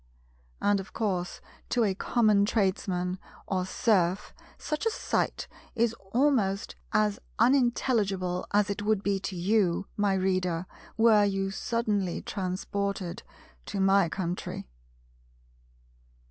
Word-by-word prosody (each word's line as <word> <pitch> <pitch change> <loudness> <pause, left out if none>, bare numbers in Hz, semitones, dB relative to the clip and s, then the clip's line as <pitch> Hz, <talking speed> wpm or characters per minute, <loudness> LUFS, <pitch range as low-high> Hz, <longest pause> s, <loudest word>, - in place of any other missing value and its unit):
And 205 -1 +2
of 195 - -9
course 185 -5 -2 0.3
to 240 - +2
a 200 -3 +2
common 210 0 +3
Tradesman, 185 -3 0 0.3
or 185 -1 -1
Serf, 190 -2 +1 0.2
such 305 +9 -2
a - - +4
sight - - -1 0.3
is 230 -1 +2 0.2
almost 230 -7 +1 0.2
as 210 -1 +2 0.2
unintelligible 225 -7 +2
as 205 0 +3
it 200 - -3
would 210 -1 +1
be 200 -1 +1
to 195 0 -5
you, 190 0 +1
my 205 -2 +2
Reader, 185 -2 0 0.3
were 220 -2 +6
you 195 -1 0
suddenly 205 -4 -1
transported 195 -1 -3 0.5
to - - -3
my 195 -2 +4
country. 180 0 -4
200 Hz, 115 wpm, -28 LUFS, 185-215 Hz, 0.5 s, were